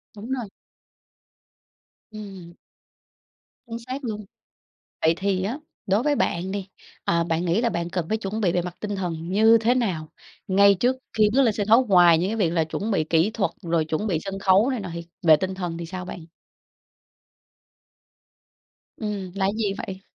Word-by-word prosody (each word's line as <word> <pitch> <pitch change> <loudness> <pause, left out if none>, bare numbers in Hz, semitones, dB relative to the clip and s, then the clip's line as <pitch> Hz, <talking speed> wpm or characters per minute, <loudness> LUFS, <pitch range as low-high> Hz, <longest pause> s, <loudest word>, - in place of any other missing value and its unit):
Đúng 215 +5 -8
rồi. 245 -6 -3 1.6
Ừm. 195 -5 -10 1.1
Chính 230 0 -5
xác 255 +4 -6
luôn. 215 -4 -4 0.8
Vậy 160 +1 +4
thì 190 -1 0
á, 235 +8 -3 0.3
đối 200 +4 +2
với 295 +1 +2
bạn 180 -5 -1
đi, 200 -1 -4 0.4
à, 170 0 +1
bạn 165 +1 -1
nghĩ 175 +5 +2
là 240 - +2
bạn 170 -4 -3
cần 175 -2 -2
phải 220 - +1
chuẩn 215 +1 -4
bị 185 -5 +2
về 175 0 +1
mặt 180 0 -7
tinh 205 -1 -3
thần 170 -3 -4
như 220 +4 +5
thế 235 +3 +3
nào? 185 -11 -1 0.4
Ngay 200 +1 +5
trước 245 +7 +1 0.2
khi 210 -1 +5
bước 275 +3 +4
lên 225 -5 +2
sân 205 -1 -2
khấu 230 +4 +6
ngoài 175 -5 +6
những 180 +3 0
cái 225 - -2
việc 190 -7 +2
là 165 -1 +1
chuẩn 200 +7 -4
bị 195 -7 +1
kỹ 165 +5 +2
thuật 220 -3 -1
rồi 165 -2 +1
chuẩn 160 +7 -2
bị 180 -7 0
sân 195 0 -4
khấu 195 +6 +4
này 255 -4 -2
nọ 195 - -6
thì 170 0 -6 0.2
về 160 -3 +7
tinh 190 +5 -3
thần 175 -3 -4
thì 170 - -5
sao 180 +1 -6
bạn? 175 -2 -8 2.7
Ừm, 205 -4 -4
là 195 -1 0
cái 195 - +2
gì 210 -3 0
vậy? 190 -3 -6
195 Hz, 190 wpm, -24 LUFS, 170-220 Hz, 2.7 s, về